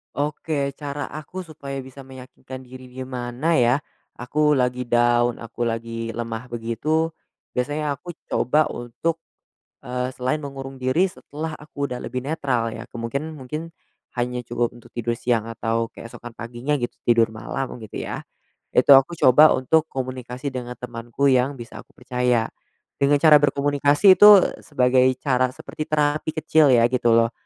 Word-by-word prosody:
Oke, 145 -1 -2
cara 145 -1 -5
aku 165 +5 -7
supaya 145 -4 -7
bisa 130 +1 -13
meyakinkan 130 0 -11
diri 130 0 -12
gimana 130 +4 -2
ya? 120 +1 +4 0.4
Aku 150 +5 +1
lagi 125 -1 0
down, 120 0 +3
aku 120 +1 -3
lagi 115 0 -4
lemah 115 +1 -5
begitu 120 +8 -1 0.5
biasanya 145 +4 -1
aku 175 +5 -9 0.2
coba 150 +5 +2
untuk, 120 +8 -3 0.6
eee, 125 +1 -3
selain 130 +3 -1
mengurung 135 -2 -7
diri 130 +9 +1
setelah 155 -2 -7
aku 145 -2 -5
udah 125 - -4
lebih 125 - -3
netral 130 -5 -1
ya, 115 - -7
kemungkin 140 +7 -4
mungkin 155 +4 -7 0.4
hanya 125 0 -3
cukup 120 0 -2
untuk 120 - -17
tidur 120 0 -2
siang 115 -2 0
atau 115 0 -1
keesokan 115 0 -11
paginya 120 +5 -2
gitu 120 -3 -3 0.2
tidur 115 -1 +4
malam 125 +3 -5
gitu 110 -2 -6
ya. - - -5 0.5
Itu 130 +2 +7
aku 135 +5 +4
coba 150 +5 +7
untuk 155 +5 +1
komunikasi 130 0 -5
dengan 125 -1 -5
temanku 120 +3 -2
yang 130 +1 +2
bisa 115 -1 -9
aku - - -30
percaya. 125 -2 0 0.5
Dengan 140 +1 +3
cara 155 0 +7
berkomunikasi 145 +6 +4
itu 205 0 +10 0.2
sebagai 130 -3 +3 0.2
cara, 130 -2 +1
seperti 155 - -7
terapi 150 +1 +1
kecil 155 -2 +3
ya 120 -2 +5
gitu 120 -1 +1
loh, 115 0 +4
130 Hz, 150 wpm, -23 LUFS, 120-145 Hz, 0.6 s, itu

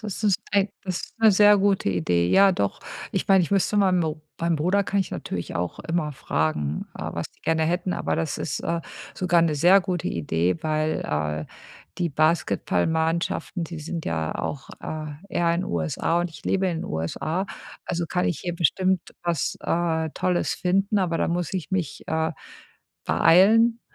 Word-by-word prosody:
das - - -6 0.6
ist 185 +4 -5
'ne 220 -1 +7
sehr 205 +1 +7
gute 195 - +2
Idee. 90 -1 +1
Ja 195 0 +6
doch, 100 - -1 0.3
ich - - -2
meine, 190 -1 +6
ich 165 - -3
müsste 195 +1 +2
ma 195 -2 +4
mo 160 -4 0 0.2
meinen 170 0 +1
Bruder 180 +6 +2
kann 200 +1 -1
ich 190 - -1
natürlich 85 - -5
auch 85 0 -3
immer 165 -2 -2
fragen, 75 - -2
äh, - - -4
was - - -3
die - - -32
gerne 160 0 +1
hätten, 175 +3 0
aber - - -1
das 155 -3 -1
ist, 150 - -3
äh, 170 0 -1 0.3
sogar 175 -2 +2
'ne 165 -2 +2
sehr 175 +7 +6
gute 180 -2 -2
Idee, 85 +2 0
weil 155 0 0
äh, 75 0 -2 0.5
die 175 -2 +1
Basketballmannschaften, 160 - 0
die 165 0 -7
sind 165 +2 -5
ja 80 -1 -2
auch, 135 -2 -4
äh, 155 -1 -5 0.2
eher 170 -1 +1
in 180 +2 -1
USA 85 - 0
und 175 - -1
ich - - -13
lebe 195 0 +1
in 170 -3 -2
USA, 155 - -2 0.4
also 175 -1 -2
kann 180 +2 -1
ich 175 - -1
hier 175 -1 -3
bestimmt 185 +3 +2 0.2
was, 170 -5 -1
äh, 165 -2 0
Tolles 180 -1 0
finden. 195 +3 +1
Aber 175 -3 0
da - - +1
muss 175 0 -2
ich 185 -4 -4
mich, 180 -6 -2
äh, 160 0 0 0.7
beeilen, 225 +7 +5
170 Hz, 175 wpm, -24 LUFS, 150-185 Hz, 0.7 s, ne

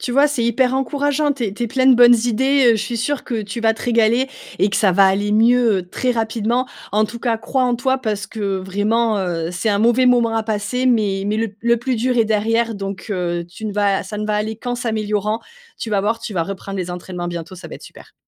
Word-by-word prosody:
Tu 250 - -4
vois, 280 +4 +4
c'est 285 -5 -2
hyper 250 +2 +1
encourageant, 285 +2 0
tu 260 -4 -4
es 200 - -3
tu 240 - -5
es - - +1
plein 260 +2 +1
de 260 - +7
bonnes 240 0 +7
idées, 265 +2 +3
heu, - - +1
je 215 - -2
suis 235 +1 -4
sûre 265 +4 -2
que 225 -3 -3
tu 205 +3 -6
vas 225 0 +3
te - - -10
régaler 235 +2 +2 0.3
et 200 - +3
que 195 - -2
ça 200 - +3
va 195 +2 +5
aller 200 +2 +1
mieux 225 -4 +3
très 255 +6 -1
rapidement. 230 +2 -1 0.2
En 215 +1 +2
tout 230 +2 -7
cas, 230 -2 0
crois 260 +4 -1
en 245 -1 +1
toi 260 +2 0
parce 215 -5 -3
que 200 -3 -3
vraiment, 205 +4 0
heu, 170 -3 -2
c'est 180 +5 -2
un 200 - +2
mauvais 240 +4 +3
moment 235 -2 +3
à 225 - 0
passer 220 +4 -2
mais 205 -5 +1
mais 210 +1 0
le 225 -2 -2
le 235 +1 +2
plus 250 +2 -2
dur 250 +2 0
est 225 - +4
derrière 225 +2 0
donc 195 +1 -6
heu, 175 -2 -2
tu 215 +5 -8
ne 210 - -4
vas 200 -1 +1
ça 205 +2 -7
ne 215 - -3
va 210 - 0
aller 215 +1 -2
qu'en 245 +1 -4
s'améliorant. 215 -2 -2 0.4
Tu 225 - -5
vas 205 -2 +2
voir, 220 +3 0
tu 230 -2 -7
vas 170 - +1
reprendre 195 +2 -6
les 180 -1 -3
entraînements 175 0 -6
bientôt, 170 +1 -6
ça 185 - -10
va - - -8
être - - -18
super. - - -14
220 Hz, 255 wpm, -19 LUFS, 200-245 Hz, 0.4 s, de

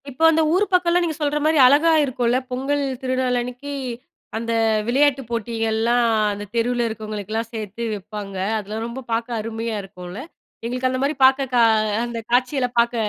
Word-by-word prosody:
இப்போ 275 +4 -4
அந்த 320 0 +2
ஊரு 385 +4 +3
பக்கம்ல 355 -1 +3
நீங்கச் 325 -3 -2
சொல்ற 295 0 +1
மாரி 315 0 +3
அழகா 290 +6 +5
இருக்குல. 250 -3 0
பொங்கல் 275 +3 -1 0.2
திருநாள் 255 -1 0
அன்னைக்கு 250 +4 -7 0.7
அந்த 230 +1 -3 0.4
விளையாட்டுப் 270 0 +2
போட்டிகள்லாம் 230 +1 0 0.3
அந்தத் 205 0 -8
தெருல 240 +1 +1
இருக்கறவங்களுக்குலாம் 215 0 -4
சேர்த்து 220 +1 -5
வைப்பாங்க. 205 -1 -7 0.2
அதுல 210 +1 -6
ரொம்ப 235 +3 -6
பார்க்க 230 +1 -1
அருமையா 225 +1 -4
இருக்கும்ல. 180 -1 -9 0.5
எங்களுக்கு 250 +2 -1
அந்த 255 0 -2
மாரி 290 +2 0
பார்க்க 265 0 +3
கா 245 - +4 0.4
அந்தக் 230 -1 -6
காட்சிகளப் 250 0 +1
பார்க்க 235 +1 +2
240 Hz, 150 wpm, -22 LUFS, 225-265 Hz, 0.7 s, அழகா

